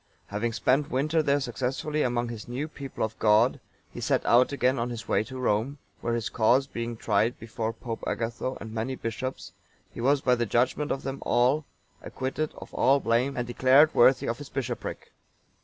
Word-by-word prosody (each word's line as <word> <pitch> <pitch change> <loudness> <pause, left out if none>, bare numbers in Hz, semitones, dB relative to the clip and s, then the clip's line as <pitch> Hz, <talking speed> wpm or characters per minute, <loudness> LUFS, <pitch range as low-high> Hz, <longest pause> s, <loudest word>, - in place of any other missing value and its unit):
(912) - - -23
Having 120 0 0
spent 135 +5 +2
the - - -10
winter 155 +4 +2
there 145 -1 +2
successfully 135 +3 -2
among 120 -2 0
this 115 -3 -7
new 130 +5 -3
people 140 -4 -6
of 110 0 -4
God, 110 +3 +4 0.3
he - - -8
set - - +1
out 125 +3 +5
again 130 -2 +1
on 120 +1 -1
his 120 -1 -6
way - - +2
to 130 - -8
Rome,(913) 125 +3 0 0.2
where 120 - -1
his 115 -2 -2
cause 125 +5 +3
being 115 -3 -5
tried 110 +3 +1
before 115 0 -4
Pope 115 -1 -7
Agatho 115 +3 -3
and 110 -1 -8
many 115 +4 -2
bishops,(914) 130 +3 -7
he - - -6
was 140 +3 +3
by 125 - +3
the 120 -1 0
judgement 130 +6 +1
of 135 - -2
them 135 0 -4
all 135 +5 +2 0.4
acquitted 135 +4 -3
of - - -11
all 135 +3 +4
blame, 125 +3 +1
and 120 - -1
declared 130 +5 +5
worthy 130 +2 +5
of 115 +3 -2
his 145 - -9
bishopric. 125 -3 -5
125 Hz, 195 wpm, -27 LUFS, 115-135 Hz, 0.4 s, out